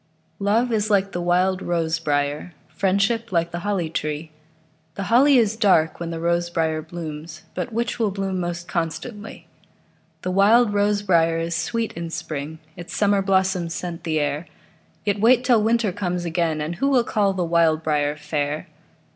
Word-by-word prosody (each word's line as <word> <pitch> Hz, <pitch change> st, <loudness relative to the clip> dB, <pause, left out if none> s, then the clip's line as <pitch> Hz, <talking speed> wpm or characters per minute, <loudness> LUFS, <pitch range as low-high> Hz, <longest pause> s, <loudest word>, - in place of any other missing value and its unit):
Love 220 Hz, +5 st, +1 dB
is 215 Hz, -1 st, 0 dB
like 200 Hz, -1 st, +2 dB
the 175 Hz, -, -3 dB
wild 180 Hz, +2 st, +2 dB
rose 165 Hz, -1 st, -1 dB
briar; 145 Hz, +2 st, -1 dB
Friendship 200 Hz, +4 st, 0 dB
like 170 Hz, -1 st, 0 dB
the 175 Hz, -, -4 dB
holly 190 Hz, -3 st, -1 dB
tree. 155 Hz, 0 st, -4 dB, 0.6 s
The 195 Hz, -, -3 dB
holly 275 Hz, +3 st, +6 dB
is 220 Hz, -3 st, +3 dB
dark 185 Hz, -8 st, +3 dB
when 170 Hz, -1 st, -4 dB
the 165 Hz, -1 st, -4 dB
rose 170 Hz, +1 st, 0 dB
briar 160 Hz, -2 st, 0 dB
blooms, 160 Hz, 0 st, -8 dB
But 245 Hz, -, -4 dB
which 235 Hz, +2 st, -2 dB
will 220 Hz, -2 st, +2 dB
bloom 195 Hz, -1 st, -3 dB
most 175 Hz, 0 st, -4 dB
constantly? 170 Hz, +3 st, -5 dB, 0.8 s
The 185 Hz, -, -1 dB
wild 205 Hz, +4 st, +4 dB
rose 205 Hz, 0 st, +1 dB
briar 165 Hz, -4 st, +3 dB
is 165 Hz, 0 st, -2 dB
sweet 230 Hz, +6 st, -2 dB
in 170 Hz, 0 st, -5 dB
spring, 155 Hz, -1 st, -5 dB, 0.2 s
Its 175 Hz, -, -8 dB
summer 200 Hz, -1 st, +3 dB
blossoms 190 Hz, -3 st, +1 dB
scent 170 Hz, -1 st, -5 dB
the 155 Hz, -2 st, 0 dB
air; 150 Hz, +3 st, -2 dB, 0.6 s
Yet 205 Hz, -1 st, 0 dB
wait 240 Hz, +3 st, +5 dB
till 245 Hz, -4 st, +4 dB
winter 225 Hz, -1 st, +2 dB
comes 180 Hz, -2 st, -3 dB
again, 165 Hz, -2 st, 0 dB
And 160 Hz, +3 st, -4 dB
who 275 Hz, -, +1 dB
will 255 Hz, -4 st, +4 dB
call 205 Hz, -3 st, +1 dB
the 180 Hz, -2 st, -1 dB
wild 165 Hz, -1 st, +2 dB
briar 150 Hz, -1 st, 0 dB
fair? 150 Hz, 0 st, -3 dB
175 Hz, 170 wpm, -23 LUFS, 165-205 Hz, 0.8 s, holly